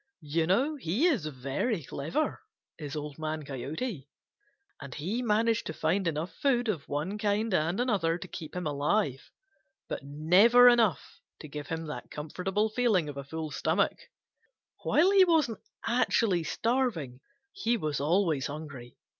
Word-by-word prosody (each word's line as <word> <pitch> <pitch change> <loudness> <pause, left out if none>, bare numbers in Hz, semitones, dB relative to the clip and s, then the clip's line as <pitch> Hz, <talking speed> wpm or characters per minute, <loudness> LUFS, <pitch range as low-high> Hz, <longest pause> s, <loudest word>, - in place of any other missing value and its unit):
You 160 +2 0
know 270 - +2
he 220 - 0
is 265 - +2
very 140 - -2
clever, 155 - -2 0.4
is 145 -1 -6
Old 150 0 -6
Man 155 0 -3
Coyote, 140 - -5 0.7
and 140 -3 -8
he 190 +11 -2
managed 225 0 +1
to 160 - -4
find 190 -1 0
enough 165 +2 -2
food 245 +2 +1
of 165 -9 -3
one 160 +9 -2
kind 210 +1 0
and 170 +3 +1
another 195 -9 +1
to 185 - -8
keep 160 -2 -8
him 180 -1 -3
alive, 145 0 0 0.6
but - - -4
never 180 - +6
enough 235 -6 +3 0.2
to 155 - -8
give 145 0 -7
him 165 0 -4
that 150 - -7
comfortable 185 +8 -2
feeling 215 -8 +1
of 145 - -7
a 140 - -4
full 155 +2 -5
stomach. - - 0 0.8
While 350 +6 +3
he 395 -1 +7
wasn't 315 -10 +2 0.3
actually 225 -7 +2
starving, 225 - -1 0.3
he 240 - 0
was 150 -8 -2
always 160 -2 +1
hungry. 140 -5 -8
170 Hz, 150 wpm, -29 LUFS, 150-230 Hz, 0.8 s, he